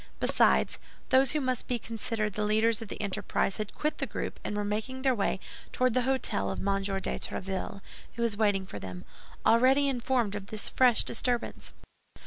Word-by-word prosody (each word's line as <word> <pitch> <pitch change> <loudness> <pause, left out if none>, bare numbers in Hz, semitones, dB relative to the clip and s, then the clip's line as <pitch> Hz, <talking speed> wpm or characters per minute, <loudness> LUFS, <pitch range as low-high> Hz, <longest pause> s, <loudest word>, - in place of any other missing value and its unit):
Besides, - - +3 0.3
those 260 0 +5
who 305 - +1
must 255 -3 -1
be 245 - 0
considered 220 -2 -3
the 210 - -1
leaders 220 +1 +2
of 225 - -6
the - - -7
enterprise 200 -1 -1
had 215 -1 -5
quit 300 +1 -1
the - - -1
group - - -4
and 210 - -3
were 205 - 0
making 220 +6 -3
their 265 -2 +4
way 200 -4 0 0.3
toward 255 -2 +2
the 255 - +3
hôtel 260 -4 0
of - - -4
M. 195 0 0
de 195 -1 -2
Tréville, 190 +1 -4 0.3
who 235 - -1
was 230 -3 +1
waiting 205 -3 +2
for 105 - -7
them, 90 -2 -7 0.4
already 260 +5 +5
informed 245 -4 0
of 205 -1 -5
this 215 0 -5
fresh 250 -3 +4
disturbance. 240 0 -2
220 Hz, 185 wpm, -29 LUFS, 205-255 Hz, 0.4 s, those